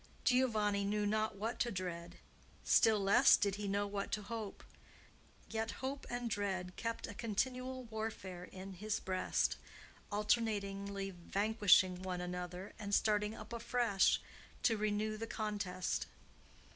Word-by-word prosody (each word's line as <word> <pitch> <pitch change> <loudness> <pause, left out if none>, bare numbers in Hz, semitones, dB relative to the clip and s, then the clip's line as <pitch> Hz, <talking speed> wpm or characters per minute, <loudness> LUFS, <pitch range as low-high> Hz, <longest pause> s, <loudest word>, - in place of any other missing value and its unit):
Giovanni 215 -6 +3
knew 205 +1 0
not 215 0 +1
what 220 +4 -3
to 240 - +2
dread; 175 -3 -5 0.5
still 220 -2 +5
less 195 0 +6
did 200 -1 0
he 205 -1 -3
know 200 +1 +1
what 200 0 -3
to 210 - -1
hope; 215 -1 -5 0.8
yet 225 0 -2
hope 270 +1 -4
and 245 0 -2
dread 190 -4 -2
kept 230 0 -3
a 205 - -7
continual 255 +4 -2
warfare 220 -6 -5
in 190 +1 -9
his 210 +3 -2
breast, 185 -1 0 0.5
alternately 200 -2 0
vanquishing 190 0 +3
one 185 -1 -3
another 180 +1 -5
and 200 -1 0
starting 210 0 +2
up - - -9
afresh 230 -4 +2 0.4
to 225 - +4
renew 215 0 0
the 225 +1 -4
contest. 205 -5 -2
205 Hz, 135 wpm, -36 LUFS, 195-220 Hz, 0.8 s, less